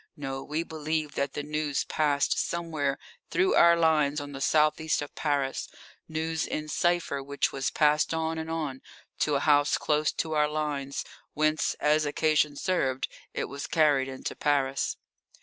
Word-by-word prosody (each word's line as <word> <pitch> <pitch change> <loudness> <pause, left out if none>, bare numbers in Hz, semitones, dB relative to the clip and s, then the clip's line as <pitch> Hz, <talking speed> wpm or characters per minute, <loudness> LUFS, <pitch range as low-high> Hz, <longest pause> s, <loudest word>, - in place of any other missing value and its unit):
No, 135 -2 -4
we 155 +3 -2
believed 155 -2 -3
that 140 0 -1
the 145 - -4
news 150 -1 -1
passed 145 -2 +1
somewhere 155 -5 -1 0.3
through 375 +1 +2
our 170 0 +7
lines 155 -3 +3
on 145 0 -7
the 135 -1 -7
south 155 +2 +3
east 160 0 +1
of 145 - -10
Paris 140 -3 -1 0.4
news 160 0 -2
in 155 0 -4
cipher 175 -3 0
which 140 +1 -1
was 135 0 -1
passed 150 0 +2
on 160 0 -1
and 160 0 -5
on 150 -5 -3 0.4
to 150 - +2
a 140 - +1
house 145 -1 +4
close 150 0 +1
to 160 -1 -2
our 150 -1 +2
lines, 145 -2 -3 0.3
whence, 155 0 +1
as 150 0 +2
occasion 150 0 +2
served, 135 -6 0 0.3
it - - -1
was 140 0 -6
carried 145 -4 +3
into 130 -1 -5
Paris. 140 -2 0
150 Hz, 165 wpm, -28 LUFS, 140-160 Hz, 0.4 s, our